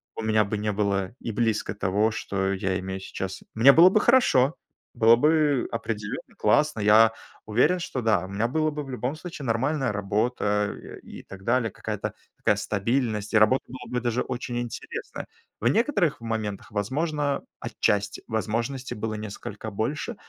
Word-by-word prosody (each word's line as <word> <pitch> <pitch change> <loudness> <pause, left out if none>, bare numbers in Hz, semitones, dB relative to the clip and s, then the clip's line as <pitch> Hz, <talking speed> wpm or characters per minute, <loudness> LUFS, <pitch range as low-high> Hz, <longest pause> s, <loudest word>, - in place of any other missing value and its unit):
у 115 - -5
меня 110 -1 +3
бы 105 +2 -3
не 105 0 -1
было 100 -2 -1
и 115 - -4
близко 110 -1 0
того, 105 +3 +1
что 95 -2 -2
я 95 0 -1
имею 95 0 -5
сейчас. 95 0 -6
Мне 120 +5 +7
было 170 +6 +8
бы 210 +3 +3
хорошо, 165 - +4 0.4
было 115 0 +6
бы 150 0 +2
определенно 110 -2 -5
классно, 150 +4 +2
я 110 +2 +6 0.3
уверен, 125 +12 +3
что 135 -6 -4
да, 105 -6 +2
у - - -10
меня 100 +4 0
было 155 +4 0
бы 150 0 -4
в 135 - -11
любом 125 +2 -3
случае 160 -3 -8
нормальная 130 +3 0
работа, 105 0 0
э, - - -11
и - - -10
так 95 -1 -12
далее, 120 0 +1
какая-то - - -5 0.2
такая 105 - +2
стабильность, 105 +1 -1
и 110 - +5
работа 110 +5 +4
была 125 0 -10
бы 125 - 0
даже 120 +1 0
очень 125 -1 -4
интересная. 120 -1 -6 0.3
В 120 - +2
некоторых 200 - +2
моментах, 110 -3 -4
возможно, 145 - -1 0.2
отчасти 105 0 -1
возможностей 115 +4 -2
было 110 +1 -3
несколько 105 0 -6
больше, 140 - -3
115 Hz, 165 wpm, -26 LUFS, 105-135 Hz, 0.4 s, было